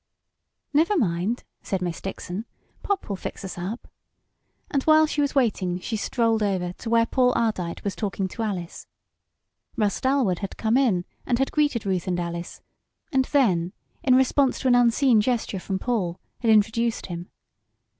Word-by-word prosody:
"Never 335 +8 +3
mind," 195 - 0 0.2
said 195 - -2
Miss 175 -2 -3
Dixon, 195 +2 -5 0.4
"Pop 400 -2 -2
will 200 - -2
fix 195 - -6
us 190 - -6
up," 190 +7 -5 0.8
and 280 - +1
while 315 0 +6
she 300 -1 -1
was 285 0 0
waiting 195 -9 +1
she 220 - -4
strolled 225 0 +1
over 185 -4 0
to 230 - -5
where 230 0 +4
Paul 250 +1 +2
Ardite 185 -7 -1
was 200 - -2
talking 195 -2 -2
to 230 - -6
Alice. 190 -6 -4 0.9
Russ 210 -3 0
Dalwood 260 -9 +2
had 195 - -6
come 220 +1 +1
in 220 -10 +2 0.2
and 245 - 0
had 270 +1 0
greeted 290 -8 +1
Ruth 185 -3 -1
and 180 -1 0
Alice, 170 0 -5 0.5
and 265 -1 +2
then, 185 - +2 0.3
in 255 -2 +4
response 265 +1 +3
to 265 - 0
an 250 - +5
unseen 245 -1 +4
gesture 225 -4 -1
from 190 +1 -3
Paul, 190 -6 -1 0.2
had 235 - 0
introduced 220 +2 +2
him. 175 -1 -6
220 Hz, 165 wpm, -25 LUFS, 185-255 Hz, 0.9 s, while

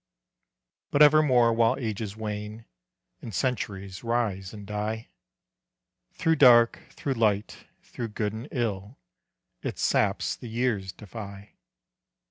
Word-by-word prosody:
But 145 - +5
evermore 140 -6 +5
while 115 0 +3
ages 110 -4 -4
wane, 105 +1 -5 0.6
And 110 - -7
centuries 100 -7 -3
rise 110 -5 -1
and 105 -2 -10
die, 105 +2 -4 1.0
Through 160 0 +1
dark, 120 -4 +6
through 140 - -3
light, 105 -4 0 0.2
through 120 - -6
good 105 -1 -3
and 115 +5 -7
ill, 110 -2 -3 0.6
Its - - -4
saps - - +1
the 120 - -9
years 110 -5 -1
defy. 100 0 -10
110 Hz, 110 wpm, -27 LUFS, 105-120 Hz, 1.0 s, dark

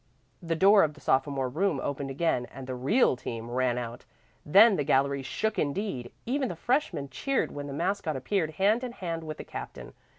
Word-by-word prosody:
The 165 -1 -2
door 195 +4 +6
of 150 -2 +1
the - - -15
sophomore 135 -1 +1
room 160 +3 0
opened 140 0 -3
again 135 -3 0
and 135 - -10
the 130 - -5
"real 135 - +3
team" 115 -1 -6
ran 125 -1 +1
out. 120 -1 -5 0.4
Then 200 +7 +7
the 145 - 0
gallery 140 +1 +2
shook 220 +11 -2
indeed! 145 - -2
Even 265 +2 0
the 175 - -5
freshmen 185 - -1
cheered 275 - -1
when 145 0 -6
the 140 - -6
mascot 170 0 -1
appeared 160 +4 -1
hand 210 +6 +3
in 245 -2 -4
hand 165 -6 -4
with 155 -1 -6
the - - -7
captain. - - -8
155 Hz, 195 wpm, -28 LUFS, 135-200 Hz, 0.4 s, Then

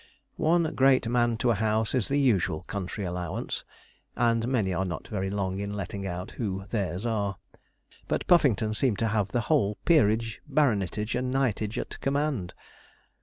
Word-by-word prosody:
One 170 +2 +4
great 130 -2 +4
man 120 -1 +2
to 120 +1 +2
a - - +4
house 110 +1 0
is 125 -6 +1
the 140 - +1
usual 95 - +2
country 100 +1 -4
allowance, 90 -1 -3 0.5
and 115 -1 +2
many 110 -8 +1
are 90 +2 0
not 90 -4 -5
very 95 -3 -2
long 95 -1 -2
in 100 0 -3
letting 100 0 -4
out 90 0 -5
who 95 -4 -3
theirs 100 -2 -2
are; 100 -4 -1 0.7
but - - -1
Puffington 120 - +4
seemed 110 -2 +1
to 115 +1 0
have 105 -3 +1
the 120 - +1
whole 115 -8 +1
peerage, 115 -8 +3
baronetage, 105 - +1
and 125 +1 -1
knightage 115 -5 0
at - - -5
command. 140 -9 -1
110 Hz, 165 wpm, -27 LUFS, 95-125 Hz, 0.7 s, One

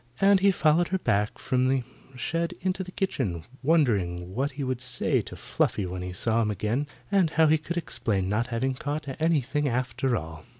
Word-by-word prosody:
And 195 0 +6
he 200 +1 +5
followed 170 -2 +3
her 190 - 0
back 105 - 0
from 130 0 +1
the 130 -1 +1 0.3
shed 165 +6 -2
into 185 0 -1
the 185 - -10
kitchen, 110 - -2 0.2
wondering 100 - +1
what 135 +5 -1
he 140 +1 -4
would 130 -2 -2
say 125 -1 0
to - - -9
Fluffy 100 - 0
when 90 0 -5
he 90 0 -4
saw 115 +5 +1
him 110 - +1
again, 110 +8 -1 0.2
and 190 -5 +4
how 160 +1 +4
he 155 0 +4
could 170 +3 -5
explain 100 - -1
not 110 +5 0
having 130 +2 -1
caught 145 +3 -4
anything 150 -2 +1
after 125 0 0
all. 80 -2 -7
130 Hz, 195 wpm, -27 LUFS, 105-160 Hz, 0.3 s, And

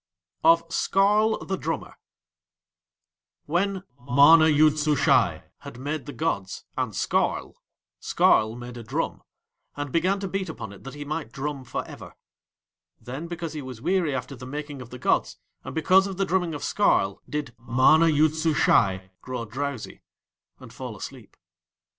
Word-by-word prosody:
OF 165 +1 +6
SKARL 210 +3 +2
THE 190 - -2
DRUMMER 165 0 -4 1.5
When 185 +4 -1 0.2
MANA 145 +5 +7
YOOD 155 0 +4
SUSHAI 150 -1 +2 0.2
had - - -10
made 145 +1 -4
the - - -5
gods 145 -12 -3
and - - -2
Skarl, - - 0 0.5
Skarl 110 +1 +3
made 120 0 -8
a 120 - -8
drum, 110 - -3 0.6
and 145 -2 -4
began 185 +5 +1
to 195 - -3
beat 190 -1 -3
upon 110 -10 -7
it 100 - -15
that 135 - -8
he 145 0 -7
might 155 +2 -4
drum 140 0 -4
for 125 - -5
ever. - - -11 0.8
Then 135 +7 -7
because 170 -2 -5
he 150 - -5
was 130 -4 -8
weary 175 -1 0
after 130 +2 -5
the 125 0 -10
making 145 0 -6
of 120 - -10
the 125 - -8
gods, - - 0 0.3
and 130 - -8
because 185 +5 +4
of 190 -2 -6
the 195 - +1
drumming 180 -4 0
of 145 - -6
Skarl, 100 - +1
did 150 -5 -4
MANA 130 +8 +4
YOOD 155 0 +3
SUSHAI 95 - +2
grow 125 -2 -5
drowsy 130 +2 -5 0.6
and - - -13
fall - - -7
asleep. - - -10
150 Hz, 155 wpm, -25 LUFS, 130-165 Hz, 1.5 s, MANA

